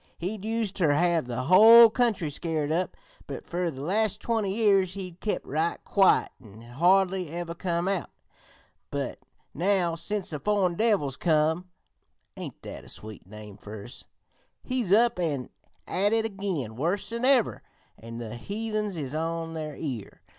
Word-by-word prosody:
He'd 190 +3 -4
used 220 -2 -2
ter 160 -6 +3
have 170 -2 +2
the 125 +1 -3
whole 225 - +9
country 215 -11 +1
scared 155 -1 -2
up, 175 +3 -1 0.3
but - - -7
fer 175 0 -2
the 135 -4 -8
last 210 +5 +1
twenty 220 -4 -1
years 195 -3 +2
he'd 185 -3 -7
kep' 215 - -2
right 160 +4 -1
quiet 195 -2 +3
an' 110 -2 -14
had 120 +2 -13
hardly 185 +1 +3
ever 170 +1 -5
come 170 0 -2
out; 195 -2 -1 0.8
but - - -4 0.3
now 180 0 +1
sence 200 +3 -3
the 150 - -4
foreign 200 -1 +1
devils 180 - +1
come 160 +2 +1 0.7
(ain't - - -8
that - - -8
a - - -13
sweet 110 -4 -10
name 105 0 -11
fer 105 0 -9
us?) 120 - -11 0.6
he's 250 -7 -2
up 230 -1 +4
an' 145 -7 -2 0.4
at 205 +3 +1
it 225 0 +2
again 190 - -3
worse 175 - -1
than 235 +1 -4
ever, 255 -3 +3 0.4
an' 115 +1 -9
the 120 0 -6
heathens 210 - -3
is 140 -3 -4
on 165 +1 -3
their 155 -2 -5
ear. 125 -9 -6
175 Hz, 160 wpm, -27 LUFS, 150-205 Hz, 0.8 s, whole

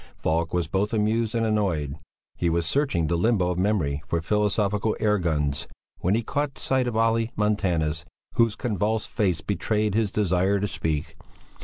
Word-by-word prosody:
Falk 80 +1 0
was 90 -1 0
both 95 +6 -1
amused 110 +1 +1
and 115 -1 +1
annoyed. 90 -10 0 0.4
He 85 - 0
was 85 0 +1
searching 95 - +1
the 85 - 0
limbo 90 -1 +2
of 90 - -2
memory 90 -8 +1
for 85 - 0
philosophical 105 +3 +1
air 105 -1 +2
guns, 75 -5 -1 0.3
when 95 +4 +1
he 115 - 0
caught 145 +3 -2
sight 130 -2 +1
of 115 -2 -2
Olle 115 0 +2
Montanus, 85 -7 0 0.3
whose 115 -2 +3
convulsed 110 -1 -1
face 95 -8 0
betrayed 105 0 0
his 110 -1 +2
desire 95 0 +1
to 105 - 0
speak. 80 -3 -3
100 Hz, 165 wpm, -25 LUFS, 85-110 Hz, 0.4 s, whose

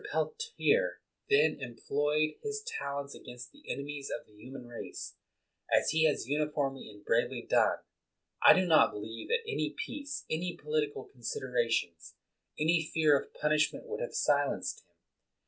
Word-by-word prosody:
Peltier 460 +2 +1 0.3
then 420 - +4
em 120 -3 -6
ployed 150 +3 0
his 430 0 -3
talents 140 - -4
against 125 0 -10
the - - -19
enemies 140 0 -5
of 150 - -4
the 105 - -24
human 125 +4 -10
race, 120 -1 -7 0.6
as - - +4
he 160 +1 +4
has 150 -6 +1
uniformly 145 -2 -1
and 105 -1 -15
bravely 115 +1 +1
done. - - +4 0.6
I - - +10
do 185 - +3
not 160 -3 +6
believe 110 +2 -6
that 470 -2 0
any 445 - -1
peace, 290 -11 -5
any 175 +2 -2
po 150 - -14
litical 150 -1 -1
considerations, 115 -8 -2 0.4
any 160 +2 +3
fear 155 -2 +5
of 140 - -2
punishment 150 - +1
would 460 0 -5
have - - -4
silenced - - +1
him. - - -30
150 Hz, 150 wpm, -31 LUFS, -, 0.6 s, I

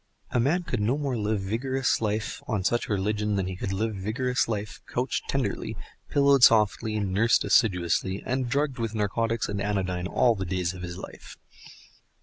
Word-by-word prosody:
A 120 - +1
man 155 +9 +2
could 125 -8 -3
no 115 +7 +1
more 140 -4 -2
live 105 -2 -1
vigorous 125 +7 0
life 110 0 -2
on 105 -5 -1
such 120 +5 0
religion 105 +1 0
than 95 -2 0
he 95 0 -4
could 95 +1 -4
live 110 +3 -1
vigorous 120 +6 -1
life 105 -2 -4
couched - - -2
tenderly, - - -2 0.3
pillowed 140 -1 +4
softly, 110 -1 +4
nursed 105 +3 +2
assiduously, 95 -2 +2
and 130 -1 -1
drugged 140 -1 0
with 115 -1 -2
narcotics 115 +2 0
and 100 -1 -3
anodyne 95 -3 -1
all 120 +4 +3
the 95 -3 -4
days 90 -1 -1
of 90 - -9
his 90 0 -6
life. - - -10
105 Hz, 170 wpm, -27 LUFS, 95-120 Hz, 0.3 s, pillowed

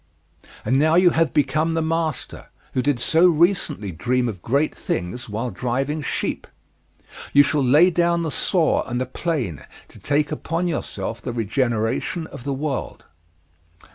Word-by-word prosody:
And 130 +5 +2
now 155 +2 +3
you 180 0 +6
have 165 0 +1
become 155 +3 +1
the 165 - +1
master, 160 -3 -3 0.3
who 130 - +1
did 135 -1 0
so 165 +8 +4
recently 165 - +2
dream 125 +8 0
of 100 -6 -5
great 140 +6 +1
things 100 +7 -4
while 115 +4 -3
driving 135 +9 -2
sheep. - - -3 0.9
You 145 - +8
shall 145 -1 0
lay 150 +8 +5
down 170 0 +1
the 160 - -2
saw 170 0 +1
and 125 0 -2
the 130 - -1
plane 130 - -3 0.3
to - - -15
take 145 +1 0
upon 165 +3 -2
yourself 150 -8 -4
the 125 - -4
regeneration 120 - -1
of 125 - -11
the 140 - -1
world." 140 -1 -4
145 Hz, 155 wpm, -22 LUFS, 120-165 Hz, 0.9 s, You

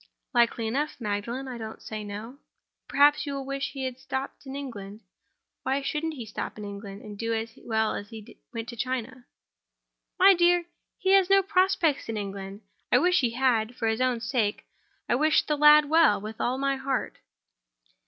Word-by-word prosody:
"Likely 235 -1 +2
enough, 280 +7 -2
Magdalen; 230 +4 -3
I 250 -2 -6
don't 220 0 -7
say 215 -1 -6
no." 215 +6 -8 0.5
"Perhaps 295 +1 +4
you 280 - -3
will 275 -1 -5
wish 275 0 -3
he 270 -2 -5
had 260 -1 -4
stopped 265 +1 -5
in 265 - -6
England? 215 -7 -7 0.6
Why 275 +1 -1
shouldn't 315 +3 -2
he 245 -5 -7
stop 215 - -6
in 210 - -6
England, 200 0 -8
and 210 -1 -9
do 230 0 -1
as 225 0 -4
well 220 -1 +1
as 205 - -5
if - - -24
he 220 -2 -11
went 230 -1 -5
to 240 - -7
China?" 255 0 -4 0.9
"My 390 +1 +8
dear! 350 -1 +3 0.3
he 380 -1 +1
has 390 -1 +5
no 390 0 +5
prospects 370 -8 +2
in 225 - -2
England. 195 0 -6 0.3
I - - +6
wish 360 +1 +3
he 240 -4 0
had, 240 -2 +1
for 225 - -2
his 220 +2 0
own 250 -2 +1
sake. 225 -5 -1 0.4
I - - +1
wish 310 +5 +3
the 300 - 0
lad 300 0 +7
well, 320 -8 +5
with 215 +2 -7
all 250 +2 0
my 275 0 0
heart." 265 0 -3
255 Hz, 190 wpm, -27 LUFS, 220-285 Hz, 0.9 s, My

